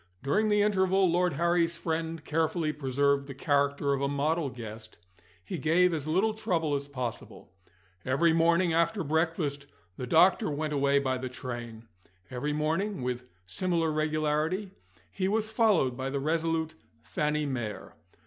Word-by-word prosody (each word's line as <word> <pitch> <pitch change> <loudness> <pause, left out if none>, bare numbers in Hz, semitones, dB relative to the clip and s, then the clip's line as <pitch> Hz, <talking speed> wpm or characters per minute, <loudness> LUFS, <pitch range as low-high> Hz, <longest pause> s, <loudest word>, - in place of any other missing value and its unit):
During 210 +10 +1
the 210 -1 +3
interval, 190 -2 +3
Lord 175 0 +2
Harry's 170 +2 +1
friend 160 -1 -3
carefully 160 0 0
preserved 140 0 0
the 140 - -8
character 140 0 +1
of 135 - -2
a 140 - +1
model 145 +2 0
guest 110 -3 -9 0.5
he 180 - -5
gave 170 +5 +3
as 155 -2 -3
little 190 +8 +2
trouble 165 -8 -1
as 140 0 -2
possible. 125 -9 -6 0.5
Every 160 +6 +2
morning 170 +1 +3
after 170 +4 +1
breakfast 155 -2 -1 0.3
the 125 - -5
doctor 165 +4 +4
went 150 +1 -2
away 140 0 +2
by 130 -2 0
the 130 0 -4
train. 120 -3 -7 0.4
Every 130 +4 -2
morning 160 +4 -1
(with 125 0 -3 0.2
similar 165 - 0
regularity) 155 +5 0 0.4
he 190 -1 -1
was 220 +2 0
followed 210 - +3
by 130 +1 -3
the 140 +1 -2
resolute 160 +1 -1 0.3
Fanny 150 0 -1
Mere. 120 -7 -4
155 Hz, 150 wpm, -29 LUFS, 140-170 Hz, 0.5 s, doctor